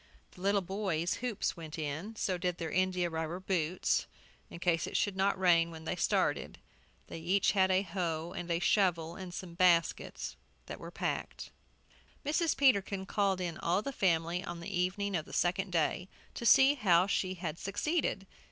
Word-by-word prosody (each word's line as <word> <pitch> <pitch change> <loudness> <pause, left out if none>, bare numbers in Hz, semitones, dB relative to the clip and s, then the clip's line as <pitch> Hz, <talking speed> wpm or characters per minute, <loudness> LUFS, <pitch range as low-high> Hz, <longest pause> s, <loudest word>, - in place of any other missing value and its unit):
The 180 - -15
little 200 +1 +2
boys' 185 -3 -1
hoops 245 -5 -1
went 160 -2 -8
in; 160 +8 -4
so 190 -3 -1
did 180 0 -1
their 165 -2 -4
india 185 -1 +1
rubber 160 +1 -3
boots, 185 -2 0 0.4
in - - -9
case 170 -2 +1
it - - -1
should 205 -2 0
not 190 0 +1
rain 170 -2 +4
when 160 -1 -10
they - - -1
started. - - 0 0.5
They - - -8
each 185 +4 +2
had 190 -2 +3
a 190 +1 +3
hoe 170 -2 -3
and 175 0 -4
shovel, 170 -5 +2
and 185 -2 -7
some 175 -1 -7
baskets, 170 -1 +1 0.3
that - - -7
were - - -8
packed. - - -4 0.7
Mrs. 315 +2 +1
Peterkin 200 -7 +3
called 195 -2 +1
in 175 -3 -4
all 180 +5 +1
the 275 - -4
family 170 -3 +1
on 175 0 -6
the 175 +3 -5
evening 190 +2 0
of 155 -3 -2
the - - -12
second 185 +2 0
day 175 +2 0 0.2
to 235 - -2
see 270 +5 +7
how 185 -9 +4
she 190 -1 -1
had 170 -3 -5
succeeded. 210 - -1
180 Hz, 175 wpm, -32 LUFS, 170-195 Hz, 0.7 s, see